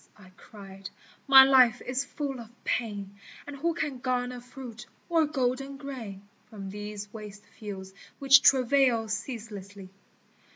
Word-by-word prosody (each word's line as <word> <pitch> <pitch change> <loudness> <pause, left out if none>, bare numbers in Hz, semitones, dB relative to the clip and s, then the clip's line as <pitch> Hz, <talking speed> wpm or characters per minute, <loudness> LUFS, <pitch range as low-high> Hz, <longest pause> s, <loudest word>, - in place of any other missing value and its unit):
I 185 -3 -17
cried, 195 0 -11 0.2
" - - -30
my 270 -1 +10
life 255 -3 +5
is 255 +2 -1
full 280 -2 -5
of 230 -2 -10
pain, 200 -4 -3 0.3
And 290 - -8
who 330 +4 -1
can 295 -6 -3
garner 250 0 -2
fruit 245 -2 -10 0.2
or 325 -2 +3
golden 275 -1 -2
grain, 230 -9 -8 0.2
From 195 -3 -8
these 210 0 -7
waste 210 -2 -10
fields 190 -3 -7 0.2
which 275 0 +6
travail 255 -3 +4
ceaselessly 205 -4 -6
240 Hz, 135 wpm, -28 LUFS, 205-270 Hz, 0.3 s, my